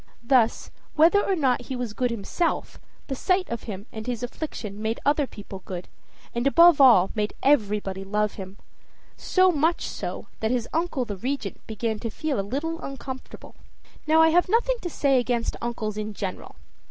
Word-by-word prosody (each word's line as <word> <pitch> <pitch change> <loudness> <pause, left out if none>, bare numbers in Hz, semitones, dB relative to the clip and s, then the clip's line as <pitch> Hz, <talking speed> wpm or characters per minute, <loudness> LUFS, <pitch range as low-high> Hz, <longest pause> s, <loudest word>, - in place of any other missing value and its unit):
Thus, 235 -2 +2 0.2
whether 335 +6 +5
or 390 - +1
not 265 -6 +1
he 260 - -4
was 245 -4 -4
good 250 +2 0
himself, 235 - -2 0.3
the 275 - -4
sight 365 +7 +1
of 235 - -4
him 200 -2 -6
and 220 +1 -7
his 245 -1 -3
affliction 225 -6 -5
made 220 +1 -1
other 290 0 +2
people 200 -4 -10
good, 180 -1 -6 0.5
and, 240 +3 0
above 335 +1 +7
all, 225 -9 +7
made 210 -1 -2
everybody 210 -8 +1
love 210 +1 0
him 190 0 -9 0.6
so 370 0 +3
much 325 +2 +1
so, - - -5
that 220 - 0
his 240 -1 0
uncle 320 -6 0
the 205 -3 -5
Regent 245 -2 -4
began 220 0 -2
to 230 - -3
feel 295 +2 -2
a - - +2
little 290 +11 -3
uncomfortable. 265 -1 -8 0.5
Now, 320 +1 +6
I 320 - +6
have 355 +3 +3
nothing 475 +4 +2
to 350 - -4
say 275 -4 +2
against 240 -1 -1
uncles 225 -3 -3
in 215 0 -4
general. 190 -2 -5
245 Hz, 175 wpm, -25 LUFS, 210-305 Hz, 0.6 s, above